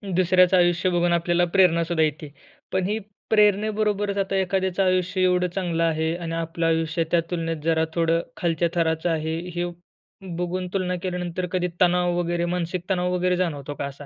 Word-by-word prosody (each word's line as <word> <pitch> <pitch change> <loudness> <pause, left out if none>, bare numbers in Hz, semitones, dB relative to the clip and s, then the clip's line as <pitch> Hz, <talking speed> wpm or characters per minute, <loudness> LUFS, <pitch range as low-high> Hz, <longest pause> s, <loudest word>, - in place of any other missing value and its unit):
दुसऱ्याचं 185 0 +4
आयुष्य 175 +1 +3
बघून 175 0 +2
आपल्याला 175 +1 +2
प्रेरणासुद्धा 170 -3 +3
येते. 150 -1 -2 0.4
पण 185 -1 0
ही 215 +2 -1 0.3
प्रेरणेबरोबरच, 210 -1 +2
आता 195 0 -1
एखाद्याचं 190 0 0
आयुष्य 185 0 +1
एवढं 180 0 +3
चांगलं 170 -3 -1
आहे 160 0 0
आणि 165 -2 -5
आपलं 165 0 -2
आयुष्य 165 +1 +1
त्या 175 - +4
तुलनेत 165 -1 -2
जरा 160 0 +2
थोडं 165 0 +2 0.2
खालच्या 170 -1 0
थराचं 165 0 +1
आहे. 160 0 -1 0.2
हे 175 0 -1 0.7
बघून 180 +1 -2
तुलना 185 -2 -1
केल्यानंतर, 180 0 -3
कधी 180 -1 0
तणाव 180 0 +3
वगैरे 175 0 -1
मानसिक 175 0 -3
तणाव 180 -1 0
वगैरे 180 0 +1
जाणवतो 145 -5 -2
का 140 - -1
असा? 140 +1 -8
175 Hz, 160 wpm, -24 LUFS, 165-185 Hz, 0.7 s, दुसऱ्याचं